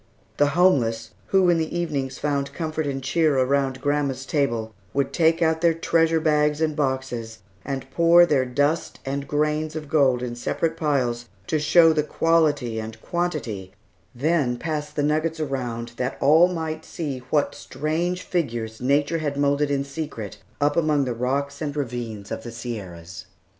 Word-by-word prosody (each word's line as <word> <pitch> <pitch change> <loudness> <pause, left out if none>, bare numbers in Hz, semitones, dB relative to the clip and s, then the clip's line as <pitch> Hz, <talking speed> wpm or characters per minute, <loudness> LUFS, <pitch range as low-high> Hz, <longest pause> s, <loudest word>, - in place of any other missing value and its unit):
The 145 - +4
homeless, 115 -11 +3 0.2
who 190 -2 +4
in 170 - +2
the 160 +2 -2
evenings 145 -6 -2
found 140 -1 -1
comfort 155 -2 -2
and 135 -1 -3
cheer 150 +1 +2
around 135 0 +1
grandma's 140 -2 -1
table, 120 -7 -1 0.2
would 140 -1 0
take 165 0 +3
out 160 0 +1
their 170 -1 +4
treasure 165 0 +2
bags 150 -1 +2
and 155 -2 0
boxes 130 -5 -2 0.3
and 135 -1 -4
pour 170 +3 +6
their 145 -6 +2
dust 145 +5 0
and 140 +1 -3
grains 150 +1 0
of 155 -1 -5
gold 135 -5 +3
in 120 -1 -4
separate 160 +6 -1
piles, 125 -7 -1 0.2
to 155 - 0
show 160 +2 +6
the 155 - +2
quality 150 -7 +1
and 110 0 -7
quantity, 125 - -3 0.4
then 140 -2 +1
pass 150 0 -3
the 150 0 -2
nuggets 155 +2 0
around 125 -5 -3
that 130 +1 -2
all 160 +5 +6
might 160 -3 -4
see 145 -6 -4
what 145 -2 +1
strange 165 +6 -2
figures 120 -10 -3
nature 145 +5 +2
had 145 -2 -2
moulded 145 0 +2
in 140 -1 0
secret 140 - -6 0.2
up 145 0 +2
among 150 -4 +2
the 125 - -2
rocks 140 +4 -2
and 145 -2 -3
ravines 115 -7 -4
of - - -3
the 120 - -8
Sierras. 95 -7 -7
145 Hz, 165 wpm, -24 LUFS, 125-160 Hz, 0.4 s, pour